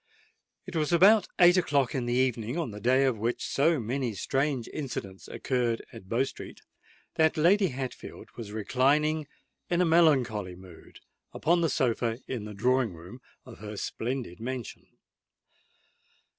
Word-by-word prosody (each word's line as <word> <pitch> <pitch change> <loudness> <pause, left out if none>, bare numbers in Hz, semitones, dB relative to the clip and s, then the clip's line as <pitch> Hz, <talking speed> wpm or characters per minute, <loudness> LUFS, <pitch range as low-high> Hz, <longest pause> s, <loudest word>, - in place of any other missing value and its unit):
It 190 - -9
was 155 -1 0
about 195 +5 +6
eight 175 0 +6
o'clock 140 -7 +1
in 125 -2 -2
the 120 - 0
evening 125 0 0
of 160 -9 -2
the 105 - -8
day 130 +4 +3
on 125 -5 0
which 115 +3 -2
so 160 +2 +2
many 120 0 -2
strange 135 +2 -1
incidents 105 -10 -6
occurred 120 -3 -1
at 95 - -12
Bow 120 +3 +2
Street, 135 - -8 0.6
that 160 0 +3
Lady 190 +5 +4
Hatfield 130 -3 -7
was 110 -3 -8
reclining 140 +8 +1 0.4
in 175 - +1
a 180 - +4
melancholy 130 - +2
mood 90 -2 -15 0.3
upon 170 +2 +2
the 165 - +2
sofa 120 -3 0
in 120 -5 -4
the 105 -1 -8
drawing 125 -2 +1
room 90 +10 -12 0.2
of 125 -3 -12
her 105 -1 -7
splendid 115 -7 -4
mansion. 125 -1 -6
130 Hz, 150 wpm, -28 LUFS, 115-155 Hz, 0.6 s, about